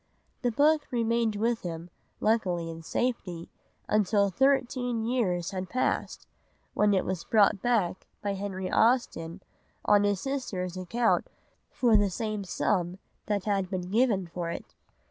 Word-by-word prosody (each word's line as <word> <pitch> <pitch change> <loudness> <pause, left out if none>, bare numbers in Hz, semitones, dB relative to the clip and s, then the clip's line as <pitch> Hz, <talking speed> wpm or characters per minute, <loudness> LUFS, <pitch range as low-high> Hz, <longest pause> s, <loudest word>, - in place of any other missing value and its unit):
The 245 - +1
book 295 +5 +3
remained 230 -3 +1
with 230 +2 0
him, 170 0 -6 0.3
luckily 185 -7 +1
in 165 0 -8
safety, 180 -4 -3 0.4
until 205 -1 +2
thirteen 250 -2 +1
years 195 -9 0
had 185 -1 -4
passed, 255 - -1 0.5
when 205 -1 +3
it 185 - +1
was 185 -3 -3
bought 205 -3 +3
back 215 -7 0 0.2
by 200 -1 0
Henry 190 -1 -4
Austen 200 -7 +1 0.4
on 205 -1 +5
his 205 -2 +1
sister's 195 -9 -3
account 225 +6 +1 0.4
for 235 -3 +3
the 205 -1 +4
same 215 +2 -3
sum 180 -1 -1 0.3
that 205 -3 0
had 195 -3 0
been 185 -1 -4
given 215 -4 +2
for 170 0 -5
it. - - -7
205 Hz, 140 wpm, -28 LUFS, 185-235 Hz, 0.5 s, on